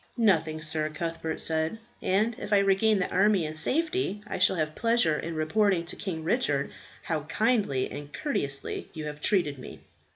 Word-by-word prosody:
"Nothing, 165 -8 +2
sir," 155 0 -1
Cuthbert 165 +1 -4
said; 160 +5 +1 0.2
"and 215 +5 +1
if - - -6
I 205 - +6
regain 200 +2 +3
the 185 - -1
army 195 -2 +3
in 155 - -4
safety, 315 - -1
I - - -4
shall 185 +1 +5
have 155 -2 -1
pleasure 230 -9 +2
in 165 0 -5
reporting 170 +3 +2
to 170 - -4
King 170 -6 -4
Richard 155 - 0 0.3
how 160 -2 -1
kindly 200 - +1
and 145 0 -7
courteously 140 - -2
you 155 -1 -5
have 150 0 -6
treated 150 -9 +1
me." - - -10
170 Hz, 170 wpm, -28 LUFS, 155-210 Hz, 0.3 s, I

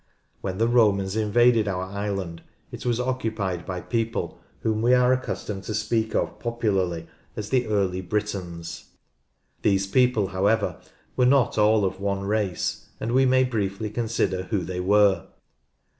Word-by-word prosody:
When 95 -1 -3
the 115 +2 +2
Romans 105 -5 +3
invaded 110 +1 +3
our 95 -2 -1
island, 95 -3 -4 0.3
it - - -6
was 120 -1 +1
occupied 110 -8 -2
by 90 -1 -4
people 115 +4 -2 0.2
whom 110 -1 0
we 125 +2 +5
are 125 0 +4
accustomed 105 -6 -4
to 110 - -3
speak 110 -1 0
of - - -1
popularly 100 -8 -1 0.3
as 105 0 -5
the 125 -2 +2
early 95 -3 0
Britons. 90 -4 -4 0.8
These 100 -2 +2
people, 115 -2 +2
however, 100 +3 0 0.3
were 125 -1 +3
not 130 -4 +3
all 105 -1 +4
of 95 0 -3
one 100 0 -1
race, 100 -3 -1
and 115 - -2
we 130 +1 +4
may 130 0 +4
briefly 105 -4 -2
consider 110 -5 -1
who 100 -2 -1
they 90 +1 -4
were. 100 -1 +3
105 Hz, 150 wpm, -25 LUFS, 95-115 Hz, 0.8 s, we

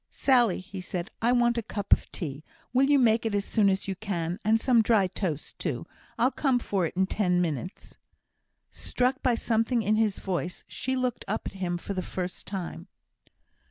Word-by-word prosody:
"Sally," 245 -7 +3
he 190 0 -8
said, 180 +1 -4
"I 235 +2 +3
want 240 -1 +3
a - - -1
cup 205 -2 +1
of - - 0
tea. 150 -4 -5 0.3
Will 270 +2 +4
you 290 - +6
make 230 -3 +4
it 220 -2 -1
as 200 0 0
soon 210 -3 +3
as 195 +1 0
you 195 - -2
can; 180 -3 -3
and 220 +1 +3
some 240 -1 +4
dry 220 -3 +4
toast 175 -5 -4
too? - - -3 0.3
I'll 250 +3 +3
come 270 -4 +2
for 195 -7 0
it 180 - -11
in 190 - +4
ten 180 -2 +1
minutes." 175 +1 -4 0.7
Struck 255 +1 -1
by 250 -3 +3
something 230 +1 +1
in 215 +1 +2
his 215 -3 +2
voice, 180 -2 -3
she 260 0 -2
looked 255 -2 -1
up 210 - -2
at - - -5
him 180 -2 -2
for 200 - -5
the 185 - -2
first 180 0 -5
time. 190 -3 -5
205 Hz, 195 wpm, -28 LUFS, 185-235 Hz, 0.7 s, you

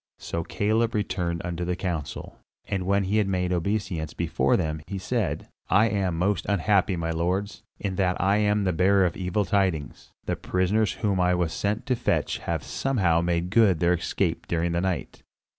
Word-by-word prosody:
So 85 - -4
Caleb 110 +6 0
returned 90 -5 -1
unto 90 0 -3
the 90 +1 -1
council; 85 -5 -5 0.3
and 95 -2 -2
when 100 0 +2
he 100 +3 0
had 105 -2 +2
made 90 -1 0
obeisance 90 -3 -2
before - - +1
them, 80 -1 -2
he 100 - -4
said, 105 0 -2 0.2
"I 105 +4 +4
am 95 -4 -1
most 90 0 0
unhappy, 100 -1 +2
my 80 -1 -2
lords, 90 +5 -1 0.2
in 95 -2 -3
that 90 -2 +1
I 100 +3 +3
am 105 -1 +2
the 95 -2 +1
bearer 95 +3 +4
of 85 - -1
evil 95 +2 -1
tidings; 95 -9 -1 0.2
the - - -1
prisoners 100 +4 +1
whom 100 -3 -1
I 90 0 +3
was 85 -2 0
sent 105 +2 -1
to 130 -3 +1
fetch 120 - 0
have - - -3
somehow 95 -12 +1
made 85 +1 -1
good 105 -6 +4
their 85 +1 +3
escape 85 - -1
during 85 0 0
the 85 +1 0
night." 90 -8 -3
95 Hz, 185 wpm, -26 LUFS, 85-100 Hz, 0.3 s, I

